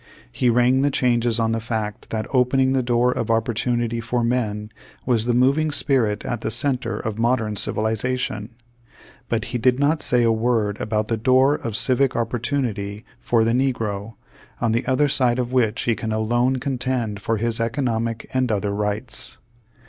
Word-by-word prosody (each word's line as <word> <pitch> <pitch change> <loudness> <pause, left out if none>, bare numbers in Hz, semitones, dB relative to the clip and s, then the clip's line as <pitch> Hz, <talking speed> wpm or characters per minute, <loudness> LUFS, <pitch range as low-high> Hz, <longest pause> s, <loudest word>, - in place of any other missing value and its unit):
He 125 - +1
rang 125 +2 +3
the 145 - +3
changes 120 -3 +2
on 115 0 +1
the 115 - 0
fact 110 -2 -4
that 110 -1 -2
opening 130 +1 +3
the 135 - +2
door 120 0 +2
of - - -3
opportunity 115 +1 0
for 120 +1 -1
men 110 -3 -1 0.3
was 115 -3 +1
the 120 - +1
moving 140 +5 +3
spirit 130 -8 0
at 120 -2 -3
the - - -2
center 120 -1 -1
of 110 0 -4
modern 115 -3 +1
civilization; 110 +2 -2 0.8
but - - -1
he 125 - 0
did 125 +2 +2
not 150 +2 +2
say 125 -1 +2
a 115 - +3
v/ord 110 -2 0
about 110 -1 -1
the 115 - -1
door 130 +5 +4
of 115 -7 -4
civic 130 +3 +2
opportunity 115 -3 -2
for 115 -2 +2
the 115 - +2
negro, 115 -5 -1 0.4
on 115 -2 +1
the 115 +3 -1
other 140 +3 +3
side 125 -3 +2
of 125 0 -2
which 120 -3 +1
he 115 - +2
can 110 0 -4
alone 120 +4 +1
contend 125 -5 -2
for 115 +2 -1
his 115 +1 -1
economic 115 -1 -1
and 130 -2 +1
other 100 -1 -1
rights. 105 +3 -4
120 Hz, 170 wpm, -22 LUFS, 110-125 Hz, 0.8 s, door